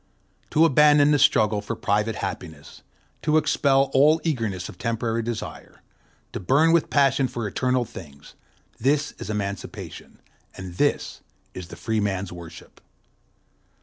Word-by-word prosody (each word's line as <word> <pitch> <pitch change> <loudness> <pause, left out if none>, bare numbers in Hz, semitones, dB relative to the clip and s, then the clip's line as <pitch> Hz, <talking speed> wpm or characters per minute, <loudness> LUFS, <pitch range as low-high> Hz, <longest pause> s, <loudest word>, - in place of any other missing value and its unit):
To 160 +2 +4
abandon 150 -1 +5
the 145 - +3
struggle 110 -6 +3
for 110 +3 -5
private 105 +1 0
happiness, 80 -2 -7 0.4
to 155 0 +2
expel 140 -3 +2
all 150 +4 +5
eagerness 110 - -2
of - - -12
temporary 115 0 -1
desire, 115 -1 -7 0.5
to - - -4
burn 140 - +3
with 170 -1 +2
passion 135 -1 +3
for 120 -3 -4
eternal 125 +3 0
things—this 115 - -5
is - - -7
emancipation, 100 -2 -6 0.4
and 95 -2 -8
this - - 0 0.3
is 90 -2 -8
the - - -10
free 110 -1 -2
man's 100 -2 -2
worship. 85 -2 -12
115 Hz, 130 wpm, -24 LUFS, 100-140 Hz, 0.5 s, abandon